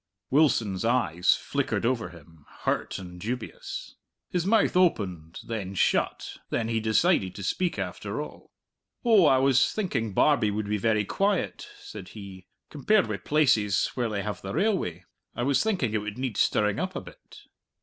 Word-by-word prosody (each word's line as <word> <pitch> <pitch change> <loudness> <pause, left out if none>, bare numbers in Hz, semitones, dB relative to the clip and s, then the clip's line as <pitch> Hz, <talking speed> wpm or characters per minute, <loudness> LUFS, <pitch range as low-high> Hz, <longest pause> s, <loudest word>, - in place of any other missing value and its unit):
Wilson's 115 -10 +2
eyes 95 -8 +2
flickered - - -2
over 115 -7 0
him, 80 -3 -16 0.2
hurt - - -1
and 90 -2 -9
dubious. 120 +3 -6 0.3
His 180 0 -1
mouth 220 -2 +3
opened 95 - +1
then 100 -4 -5
shut - - 0
then 115 - -1
he 115 -1 +1
decided 110 - +2
to 100 - -7
speak 180 - -1
after - - -4
all. - - -8 0.6
"Oh, 215 -8 +6
I 135 - +5
was 135 0 +3
thinking 135 - -2
Barbie 140 -8 +4
would 105 0 -2
be 105 +1 0
very 110 -1 +1
quiet," 195 - -1
said 100 -4 -9
he, 95 -2 -10 0.2
"compared 195 +8 +2
wi' 105 - -2
places 105 -5 +2
where 120 -3 -1
they 100 -2 -2
have 105 -2 -4
the 95 0 -5
railway. 175 - 0 0.3
I 120 - -2
was 140 +1 +2
thinking 180 - 0
it 110 - +1
would 105 +1 -6
need 130 -3 -3
stirring 105 0 +2
up 185 0 -3
a - - -3
bit." - - -15
110 Hz, 165 wpm, -27 LUFS, 100-150 Hz, 0.6 s, Oh